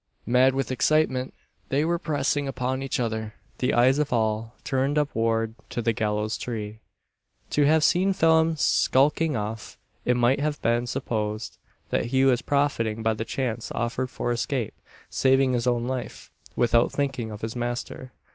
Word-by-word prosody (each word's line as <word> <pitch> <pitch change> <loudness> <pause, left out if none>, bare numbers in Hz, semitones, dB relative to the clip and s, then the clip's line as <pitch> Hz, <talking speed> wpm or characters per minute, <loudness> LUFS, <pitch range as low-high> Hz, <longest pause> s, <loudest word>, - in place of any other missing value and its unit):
Mad 125 +3 +4
with 135 -1 -1
excitement, 130 -1 +1 0.4
they 140 +3 +1
were 170 +1 0
pressing 145 -3 -1
upon 130 0 -2
each 135 -1 -2
other 110 -2 -3 0.2
the 125 - +1
eyes 130 +4 +4
of 150 -1 0
all 110 0 0
turned 135 +2 0
upward 115 -6 0 0.2
to - - -4
the 115 0 +1
gallows 105 0 -1
tree. 110 -3 -5 0.7
To 145 -1 +3
have 155 0 +4
seen 185 +4 +3
Phelim 160 -2 +3
skulking 150 +1 +2
off, 110 +1 -5 0.3
it 125 0 +2
might 120 +3 +3
have 150 0 -1
been 120 +1 +1
supposed, 110 -2 -3 0.3
that - - +1
he 130 +2 +2
was 125 -2 +3
profiting 115 -6 0
by 110 0 +2
the 110 +1 -4
chance 120 -3 -3
offered 125 +2 -2
for 120 - -3
escape 120 0 -2 0.3
saving 135 0 +3
his 120 0 0
own 120 -1 +1
life, 130 -1 -5 0.2
without 120 0 +3
thinking 135 -5 -2
of 105 -1 -8
his 110 +1 -4
master. 120 +1 -4
125 Hz, 160 wpm, -25 LUFS, 115-140 Hz, 0.7 s, Mad